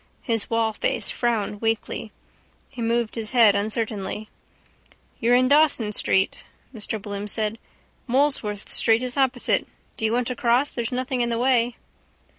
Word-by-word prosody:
His 225 -4 +1
wallface 225 -2 0
frowned 215 -4 -1
weakly. 225 -1 -2 0.6
He 255 -3 -8
moved 230 0 0
his 225 0 -4
head 220 -4 +7
uncertainly. 215 0 -2 0.9
—You're 240 +1 +3
in 255 +1 +4
Dawson 285 -6 +3
street, 190 -2 +1 0.3
Mr 220 -1 -4
Bloom 200 0 -6
said. 215 +1 -2 0.5
Molesworth 245 -6 0
street 225 +1 +2
is 250 -1 -2
opposite. 260 -3 +1 0.3
Do 220 - -2
you 220 - +1
want 245 +1 +1
to 250 - -3
cross? 245 +4 +2
There's 235 0 -3
nothing 255 0 -1
in 240 - +1
the 230 - -1
way. 245 -1 +2
230 Hz, 145 wpm, -24 LUFS, 215-250 Hz, 0.9 s, head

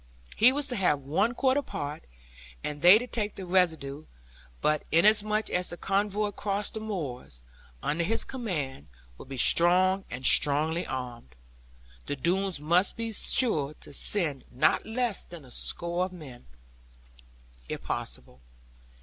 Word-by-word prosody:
He 245 +3 +6
was 285 +1 -2
to 250 - -3
have 175 -8 +1
one 195 - 0
quarter 270 +2 +2
part, 150 - -6 0.6
and 145 -1 -5
they 180 +4 +9
to 245 - -4
take 215 -4 -3
the 190 - -7
residue. 160 -6 0 0.5
But 150 - +1
inasmuch 215 +4 +3
as 180 0 -1
the 175 - -7
convoy 205 +2 0
across 205 0 -3
the 220 - -6
moors, 135 - -6 0.4
under 160 +3 0
his 225 +6 0
command, 155 - -5 0.3
would - - -12
be 135 - -6
strong, 185 +7 +4
and 130 +1 -7
strongly 155 +4 +4
armed, 120 - -7 0.7
the 145 - -2
Doones 180 +4 0
must 170 +6 +2
be 230 -1 -4
sure 155 - +2
to - - -14
send 150 -4 -1
not 125 - +1
less 230 -2 -1
than 170 -5 -12
a 125 - -16
score 170 +7 -2
of 185 - -9
men, 135 - -12 1.2
if - - -5
possible. 65 - -6
175 Hz, 145 wpm, -28 LUFS, 145-210 Hz, 1.2 s, they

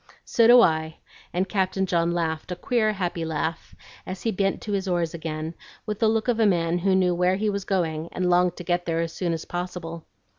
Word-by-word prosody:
"So 230 -2 +4
do 240 +1 +9
I!" 160 -4 +1 0.3
and 185 +2 0
Captain 190 -1 0
John 170 -2 +1
laughed 165 0 -2
a - - -2
queer, 215 +3 +1
happy 175 -4 -2
laugh, 160 +1 -3 0.3
as 185 0 -7
he 225 - +1
bent 195 0 0
to 210 - -4
his 195 -1 -1
oars 175 -3 0
again, 160 -1 -4 0.3
with 210 -1 -4
the 225 - +3
look 220 +1 0
of 240 -2 +1
a 220 - +5
man 170 -2 +1
who 190 +1 +2
knew 185 -1 +3
where 180 +1 +2
he 210 +2 0
was 200 -1 -4
going 165 -4 -1
and 180 0 -1
longed 180 0 +3
to 175 - -6
get 175 0 0
there 165 0 0
as 165 -1 -3
soon 175 -2 -2
as 165 -1 -3
possible. 175 -2 -5
180 Hz, 225 wpm, -25 LUFS, 165-195 Hz, 0.3 s, do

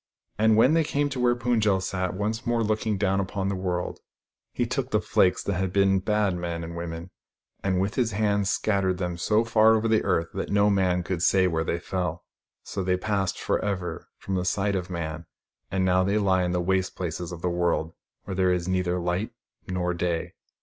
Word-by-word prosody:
And 110 0 +4
when 130 +7 +5
they 165 0 +4
came 145 -1 0
to 135 -2 -4
where 120 0 +3
Pund 120 -1 +1
jel 100 -3 +3
sat, 95 -1 -2
once 110 +4 -2
more 120 -1 +1
looking 110 -1 0
down 95 0 +1
upon 95 0 -2
the 100 - -1
world, 90 -1 -3 0.5
he - - -1
took - - -2
the - - +2
flakes 90 -1 +2
that 100 - -1
had 95 0 -1
been 95 0 +3
bad 105 -1 +1
men 85 -1 -4
and 85 +1 -7
women, 85 +1 -6 0.5
and 95 -2 +1
with 100 +3 0
his 120 -4 0
hand 100 -1 +1
scattered 95 -3 +1
them 90 -1 -2
so 105 +5 +2
far 110 -1 +5
over 110 +1 +1
the 110 -1 +3
earth 80 0 +1
that - - -3
no 105 0 +3
man 90 -2 +2
could 90 -1 -3
say 95 +1 +4
where 80 -3 +1
they 85 - -1
fell. 90 -1 -3 0.4
So 100 - -4
they 90 0 +1
passed 100 -1 -1
for - - -1
ever 95 -4 -3
from 95 - -5
the 90 -1 0
sight 100 +2 0
of 90 -1 -3
man, 80 -2 -5 0.4
and 95 0 0
now 95 0 +3
they 100 +3 +1
lie 95 -3 +2
in 90 - -1
the 90 0 0
waste 95 +1 0
places 85 -1 -4
of 85 -1 -8
the - - +1
world, 85 -2 0 0.3
where - - -5
there 95 0 +2
is 90 -1 -1
neither 90 -1 0
light 90 +5 -2 0.3
nor 90 -1 -1
day. 85 -1 -2
95 Hz, 215 wpm, -26 LUFS, 90-105 Hz, 0.5 s, when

